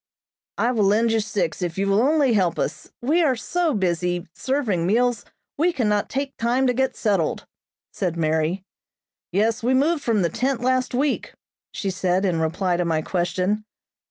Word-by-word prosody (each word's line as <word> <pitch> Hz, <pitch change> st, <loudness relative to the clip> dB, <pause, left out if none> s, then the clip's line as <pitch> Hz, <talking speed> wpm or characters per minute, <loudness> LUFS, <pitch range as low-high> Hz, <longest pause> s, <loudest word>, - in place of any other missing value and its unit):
"I'll 245 Hz, +2 st, +1 dB
lend 220 Hz, +1 st, +3 dB
you 225 Hz, -, +2 dB
six 205 Hz, -6 st, -2 dB
if 175 Hz, -1 st, -3 dB
you 195 Hz, -, +1 dB
will 200 Hz, +2 st, +3 dB
only 285 Hz, -1 st, +3 dB
help 185 Hz, -5 st, +1 dB
us. -, -, -4 dB
We 310 Hz, +8 st, +3 dB
are 280 Hz, -6 st, +3 dB
so 330 Hz, +4 st, -1 dB
busy 175 Hz, -2 st, -1 dB
serving 225 Hz, -11 st, -1 dB
meals 240 Hz, +2 st, +1 dB, 0.3 s
we 345 Hz, +3 st, +3 dB
cannot 210 Hz, -9 st, 0 dB
take 275 Hz, +1 st, -3 dB
time 245 Hz, +3 st, +1 dB
to 250 Hz, -, +3 dB
get 265 Hz, +2 st, 0 dB
settled," 195 Hz, -8 st, 0 dB, 0.5 s
said 175 Hz, -4 st, -2 dB
Mary. 160 Hz, +3 st, 0 dB, 0.7 s
"Yes, 220 Hz, +5 st, +1 dB
we 250 Hz, +3 st, +2 dB
moved 300 Hz, +4 st, +2 dB
from 225 Hz, -7 st, +1 dB
the 170 Hz, -, +1 dB
tent 260 Hz, +3 st, -1 dB
last 255 Hz, 0 st, +1 dB
week," 280 Hz, +3 st, -1 dB, 0.4 s
she 195 Hz, -, -3 dB
said 185 Hz, 0 st, 0 dB
in 175 Hz, -4 st, +1 dB
reply 175 Hz, +3 st, 0 dB
to 175 Hz, -, +1 dB
my 160 Hz, -2 st, 0 dB
question. 185 Hz, +4 st, -1 dB
215 Hz, 170 wpm, -23 LUFS, 180-255 Hz, 0.7 s, lend